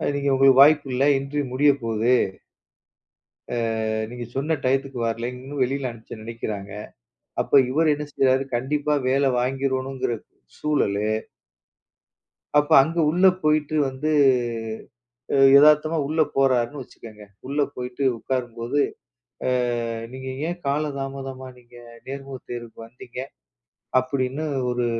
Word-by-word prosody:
நீங்க 140 0 0
உங்களுக்கு 135 0 +5
வாய்ப்பு 145 0 +6
இல்ல. 130 +2 +1
இன்டர்வியூ 140 +2 -3
முடியப்போகுது. 125 -4 +2 1.4
ஆ, - - -2 0.5
ஆ - - -2
நீங்கச் 120 0 -8
சொன்ன 150 +4 0
டயத்துக்கு 135 0 0
வரலைன்னு, 125 +4 -5
வெளியில 135 +1 -2
அனுப்ப 115 -1 -12
நினைக்கிறாங்க. 110 -3 -6 0.7
அப்ப 140 - +5
இவரு 155 +3 +3
என்ன 150 +1 -5
செஞ்சாரு? 135 0 +2
கண்டிப்பா 145 +4 -1
வேல 135 +1 +2
வாங்கிறணும்ங்கிற 130 -1 -1 0.4
சூழலு. 105 -9 0 1.5
அப்ப 145 - -1
அங்க 165 +4 -4
உள்ள 180 +4 +3 0.2
போயிட்டு 155 0 +1
வந்து, 135 +4 -2 1.5
எதார்த்தமா 150 +2 +5
உள்ள 155 +3 -1 0.2
போறாருன்னு 135 0 +2
வச்சுக்கங்க. 110 -4 -13 0.2
உள்ள 145 +2 -1 0.2
போயிட்டு 125 +2 -4
உக்காரும்போது 120 +2 -2 0.7
ஆ, - - +2 0.6
நீங்க 130 0 -6 0.2
ஏன் 175 +1 -4
கால 140 +2 0
தாமதமா 135 -1 -6
நீங்க 120 0 -18 0.3
நேர்முகத் 135 -1 -8
தேர்வுக்கு 120 -2 -7
வந்தீங்க. 125 +1 -10 0.8
அப்படின்னு 130 +2 -2 0.3
ஒரு, 125 0 0
135 Hz, 110 wpm, -23 LUFS, 125-145 Hz, 1.5 s, வாய்ப்பு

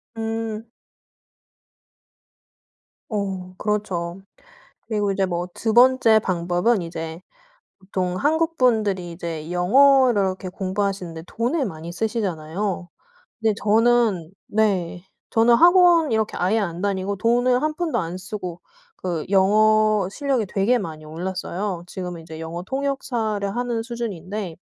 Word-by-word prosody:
음. 225 0 -4 2.4
어 195 -4 -3
그렇죠. 195 -4 -2 0.6
그리고 205 -3 -1
이제 195 -1 +1
뭐 175 -1 -3
2 220 -1 -1
번째 245 -2 +6
방법은 180 +3 +1
이제 165 0 -6 0.6
보통 185 -2 -3
한국분들이 245 - +1
이제 165 -2 -6
영어를 255 +4 +5
이렇게 190 0 -2
공부하시는데 185 -3 -3
돈을 250 - -1
많이 165 -2 -7
쓰시잖아요. 190 -3 -2 0.5
근데 220 -1 +2
저는 215 -5 +3 0.2
네 190 -5 0 0.3
저는 230 +1 +4
학원 345 0 +6
이렇게 220 -1 0
아예 190 +5 +2
안 175 -4 -3
다니고 200 0 -1
돈을 245 +4 +2
한 305 0 0
푼도 315 -6 -1
안 170 -2 -3
쓰고 185 -2 -6 0.4
그 170 -4 -3
영어 215 +1 +4
실력이 270 -2 -1
되게 200 +6 +2
많이 160 -7 -6
올랐어요. 180 +3 -4
지금은 180 -3 -6
이제 160 0 -9
영어 165 +2 -5
통역사를 240 -5 -2
하는 240 -2 -1
수준인데 210 -6 -5
200 Hz, 255 characters per minute, -23 LUFS, 180-230 Hz, 2.4 s, 번째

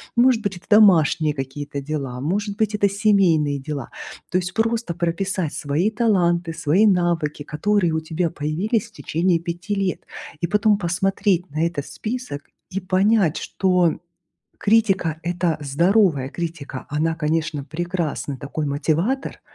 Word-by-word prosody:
Может 240 -1 +4
быть, 195 -3 -2
это - - -18
домашние 165 -7 +5
какие-то 140 +1 -5
дела, 135 -4 -4
может 200 +6 -2
быть, 215 -1 +1
это 205 -1 +3
семейные 190 -9 +2
дела. 140 -2 -5 0.4
То 180 - +2
есть 185 +1 -4
просто 225 -3 0
прописать 175 -1 -1
свои 150 +8 0
таланты, 175 -7 +1
свои 165 +6 +2
навыки, 175 -6 +1
которые 175 +3 0
у 160 - +1
тебя 160 +2 -1
появились 180 +10 -1
в - - -31
течение 170 -3 0
5 175 +3 -4
лет. 195 -2 -1 0.4
И 170 - +1
потом 210 +2 +3
посмотреть 190 0 0
на 155 +3 0
этот 145 -5 -4
список 225 - -5 0.3
и 195 - -3
понять, 190 -2 +2
что, 180 -2 +1
м, 160 - -6 0.6
критика, 195 -7 +2
это 175 -2 0
здоровая 160 0 +2
критика, 160 -4 -6
она, 155 +2 0
конечно, 155 -2 -1
прекрасный 160 -2 -3
такой 145 +3 -4
мотиватор, 165 - -1
175 Hz, 140 wpm, -22 LUFS, 155-200 Hz, 0.6 s, домашние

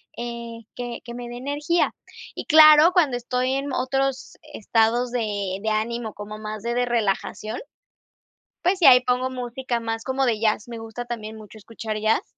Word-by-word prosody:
eh, 235 -1 -6 0.2
que 240 -1 -6
que 235 - -8
me 240 0 -7
dé 240 - -8
energía. 290 +6 0 0.4
Y - - -6
claro, 310 +1 +8
cuando 300 -9 +3
estoy 250 +2 -1
en 275 0 -3
otros 270 +1 -1 0.2
estados 230 +2 +1
de 205 -5 -2
de 220 - -1
ánimo 220 +1 -2
como 210 +1 -8
más 215 0 -6
de 235 0 -1
de 245 0 +2
relajación, 220 -1 -2 1.0
pues 370 +3 +1
sí, 345 - +3
ahí 255 -2 +9
pongo 250 +1 0
música 250 -1 -3
más 225 0 -4
como 265 0 0
de 230 -4 +1
jazz, 215 0 +1
me 235 -1 -7
gusta 225 +2 -7
también 220 -2 -6
mucho 215 0 -13
escuchar 220 0 -6
jazz. 220 +1 +1
240 Hz, 175 wpm, -23 LUFS, 220-260 Hz, 1.0 s, ahí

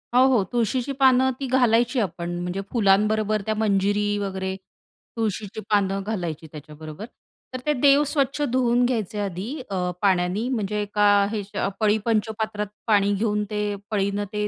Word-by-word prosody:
हो, - - +6
हो, 245 -6 +3
तुळशीची 240 +3 0
पानं 260 -1 +5
ती 275 - -3
घालायची 245 0 +2
आपण 175 -4 -3
म्हणजे 180 +2 -3
फुलांबरोबर 215 0 +2
त्या 220 - 0
मंजिरी 205 0 +1
वगैरे, 190 -1 -3 0.6
तुळशीची 215 -1 -3
पानं 195 -2 +1
घालायची 175 -7 -4
त्याच्याबरोबर. 155 +4 -9 0.5
तर 255 - -3
ते 300 - +2
देव 280 +2 +4
स्वच्छ 285 -1 -1
धुवून 245 -1 +2
घ्यायचे 220 -4 -2
आधी 195 +1 -4 0.2
अ, 180 -2 -1
पाण्यानी, 190 +3 +1
म्हणजे 210 -4 -1
एका 205 0 +1 0.2
हे 220 - -2
ह्याच्या 205 -1 -3
पळी 215 -1 +3
पंचपात्रात 220 -1 -1 0.2
पाणी 205 -2 +3
घेऊन 210 0 0
ते 210 -1 -2 0.2
पळीनं 200 0 0
ते 210 0 -1
210 Hz, 150 wpm, -24 LUFS, 195-235 Hz, 0.6 s, हो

